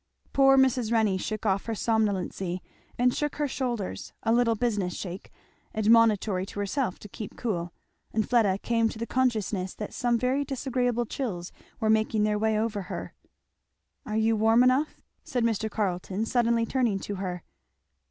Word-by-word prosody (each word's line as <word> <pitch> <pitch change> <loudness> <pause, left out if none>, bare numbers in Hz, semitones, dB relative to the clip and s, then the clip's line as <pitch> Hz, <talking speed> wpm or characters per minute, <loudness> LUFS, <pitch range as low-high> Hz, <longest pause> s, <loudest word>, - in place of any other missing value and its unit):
Poor 270 0 +6
Mrs. 255 -4 +3
Renney 215 -5 +2
shook 215 +3 -4
off 195 -1 +1
her 225 - -2
somnolency 195 -5 0 0.4
and 245 0 +3
shook 295 -1 -2
her 295 -1 0
shoulders, 245 -7 -3
a 225 - +2
little 235 -1 +3
business 210 -6 -1
shake, 185 0 -7 0.4
admonitory 215 -3 +4
to 200 +1 -7
herself 205 0 -1
to - - -11
keep 210 +1 -8
cool; 175 -7 -2 0.4
and 220 -1 0
Fleda 215 -6 +3
came 230 +1 +1
to - - -8
the 230 - -3
consciousness 215 -7 0
that 210 - -6
some 240 -2 +1
very 255 +4 +1
disagreeable 250 -3 -1
chills 195 -9 -4 0.3
were 220 - 0
making 220 0 +2
their 210 0 +1
way 220 0 +2
over 215 -1 -1
her. - - -5 0.9
"Are 215 -6 -3
you 220 +1 +3
warm 225 +3 +4
enough?" 260 +4 +2 0.3
said 245 -2 -1
Mr. 220 -1 0
Carleton 195 0 -2
suddenly, 235 -1 +2
turning 235 -4 +1
to 205 - -4
her. 180 -2 -4
220 Hz, 160 wpm, -27 LUFS, 205-245 Hz, 0.9 s, Poor